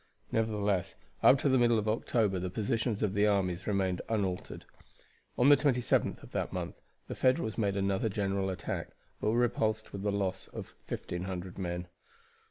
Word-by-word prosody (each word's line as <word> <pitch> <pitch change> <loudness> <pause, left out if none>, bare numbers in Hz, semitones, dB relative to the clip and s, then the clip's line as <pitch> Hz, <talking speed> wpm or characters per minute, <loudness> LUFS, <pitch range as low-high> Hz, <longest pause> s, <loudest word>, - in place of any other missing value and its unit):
Nevertheless, 105 -4 0 0.3
up 135 - +7
to - - +2
the 130 -1 +4
middle 120 -1 +4
of 110 0 -1
October 110 -3 +1
the 90 +1 -2
positions 110 +2 -1
of 100 -3 +1
the 105 +1 +3
armies 95 -3 0
remained 95 -3 +1
unaltered. 100 -5 -2 0.7
On 125 +3 +5
the 145 - +10
27th 130 -4 +1
of - - -12
that - - -2
month - - -5 0.3
the - - -4
Federals 130 -4 +1
made 100 -3 0
another 100 +2 +1
general 100 -1 -1
attack, 95 - -4 0.3
but - - 0
were 115 - +2
repulsed 110 -2 0
with 100 -1 -5
a 105 - +1
loss 100 -2 -2
of - - -8
1,500 90 +1 -5
men. 90 -1 -3
105 Hz, 170 wpm, -31 LUFS, 95-115 Hz, 0.7 s, the